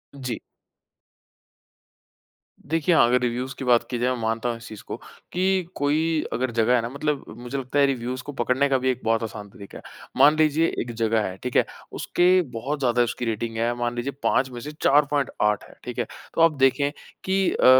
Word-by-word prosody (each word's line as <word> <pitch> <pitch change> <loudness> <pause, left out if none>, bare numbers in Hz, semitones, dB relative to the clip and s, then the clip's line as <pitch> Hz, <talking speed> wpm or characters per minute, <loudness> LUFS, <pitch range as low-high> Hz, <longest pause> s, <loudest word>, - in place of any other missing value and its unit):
जी। 125 -4 -4 2.3
देखिए, 165 +3 +1
अगर 125 -1 +5
रिव्युज़ 125 +2 -2
की 135 - -5
बात 120 -1 +4
की 120 - -2
जाए, 125 +1 +1
मैं 125 - -1
मानता 115 +2 -1
हूँ 115 - -2
इस 115 - -12
चीज़ 110 -2 -9
को - - -4 0.4
कि 185 +1 +2
कोई 155 +3 +1
अगर 130 0 -1
जगह 115 +1 +3
है 120 - +2
ना 115 - -4
मतलब 140 +1 -2
मुझे 125 +3 -5
लगता 135 +2 -1
है 140 - +6
रिव्युज़ 125 -1 -3
को 145 - -6
पकड़ने 135 +2 +2
का 135 - +3
भी 130 0 0
एक 130 0 -1
बहुत 115 0 +1
आसान 105 -2 -6
तरीका 100 0 -11
है। - - -12 0.3
मान 150 +2 +7
लीजिए 155 +1 +3
एक 120 - -5
जगह 115 -1 +1
है, 95 -2 -3
ठीक 125 - -4
है? - - +4 0.3
उसके 180 +1 +3
बहुत 135 +6 -3
ज़्यादा 120 -2 +2
उसकी 120 +1 -3
रेटिंग 115 0 -3
है, 120 +1 +1
मान 120 0 -1
लीजिए 125 +3 -2
5 130 0 +2
में 120 - -7
से 150 - -6
4.8 140 -7 +2
है, - - -15
ठीक - - -6
है? - - +1 0.3
तो - - +1
आप 165 -1 +6
देखें 135 +2 +3 0.3
कि 190 0 +2
अ, - - +1
125 Hz, 205 wpm, -24 LUFS, 115-145 Hz, 2.3 s, मान